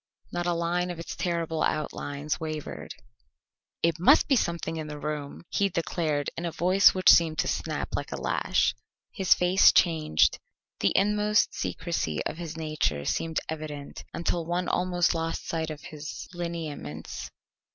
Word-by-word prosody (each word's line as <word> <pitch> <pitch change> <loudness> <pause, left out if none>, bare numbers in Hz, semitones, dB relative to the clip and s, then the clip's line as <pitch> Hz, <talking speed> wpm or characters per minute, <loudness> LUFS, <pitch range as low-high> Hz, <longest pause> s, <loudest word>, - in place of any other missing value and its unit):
Not 175 0 -2
a 175 - +2
line 175 +1 0
of 175 - -5
its 165 - -6
terrible 170 -2 -1
outlines 150 -1 -2
wavered. 155 -2 -5 0.9
"It 165 -1 +2
must 275 - +6
be 275 - +4
something 170 -6 -1
in 155 -1 -4
the 150 -1 -6
room!" 150 0 -5
he 200 -1 +2
declared 160 -4 -1
in 170 - -5
a 170 - -2
voice 185 +5 +5
which 185 - -1
seemed 160 -2 +4
to - - +1
snap - - -2
like - - -4
a - - -4
lash. - - +1 0.4
His 190 -5 +4
face 180 +2 +6
changed. 155 - +3 0.4
The 100 - +2
inmost 210 +1 +3
secrecy 165 - -2
of 155 - -3
his 165 -2 -6
nature 155 - -1
seemed 165 -1 -1
evident 150 -2 -6
until 170 0 -1
one 175 +2 -1
almost 180 -1 +1
lost 165 0 -3
sight 160 -1 -2
of 155 -1 -7
his 150 -1 -7
lineaments. 160 - -5
165 Hz, 155 wpm, -27 LUFS, 155-175 Hz, 0.9 s, must